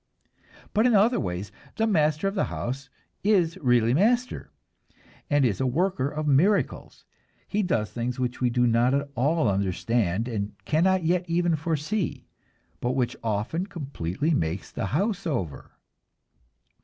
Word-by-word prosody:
But 220 +4 +4
in 240 - +4
other 220 +5 +4
ways 90 +1 -4 0.2
the 225 - +1
master 155 -4 +2
of 195 - -1
the 195 - +1
house 135 +3 -5 0.3
is 185 -6 +3
really 120 -3 +3
master, 235 - +1 0.8
and 145 -2 +3
is 110 -3 0
a 130 - +2
worker 150 0 0
of 150 +1 -4
miracles. 170 +9 +1 0.4
He 210 - 0
does 115 - 0
things 125 +1 -3
which 125 0 -2
we 125 - +3
do 125 0 +2
not 120 +3 +3
at 140 0 -2
all 140 +2 +1
understand, 100 +2 0
and 105 -4 -3
cannot 180 +4 +2
yet 180 +2 +2
even 170 0 +2
foresee, 160 +5 -2 0.5
but 125 +1 -1
which 125 -2 0
often 115 - -1
completely 145 - -3
make 85 - 0
the - - -5
house 195 - -1
over. 95 - -3
140 Hz, 145 wpm, -26 LUFS, 120-180 Hz, 0.8 s, But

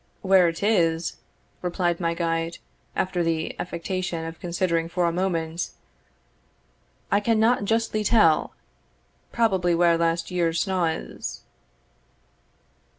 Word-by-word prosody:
"Where 190 -2 +5
it 165 +3 -3
is," 170 -6 +1 0.4
replied 175 -1 -1
my 170 -1 0
guide, 165 0 -1 0.4
after 185 -1 0
the 165 -1 -1
affectation 180 -1 -3
of 165 0 -7
considering 170 -1 -1
for 175 0 0
a 170 - +2
moment, 170 -2 -2 1.4
"I 200 - +4
cannot 225 +1 +2
justly 225 0 0
tell 205 -7 +3 0.8
probably 190 -7 +2
where 170 -1 +3
last 165 +1 0
year's 170 -2 +1
snaw 185 -3 +1
is." 160 0 -4
175 Hz, 110 wpm, -25 LUFS, 165-190 Hz, 1.4 s, Where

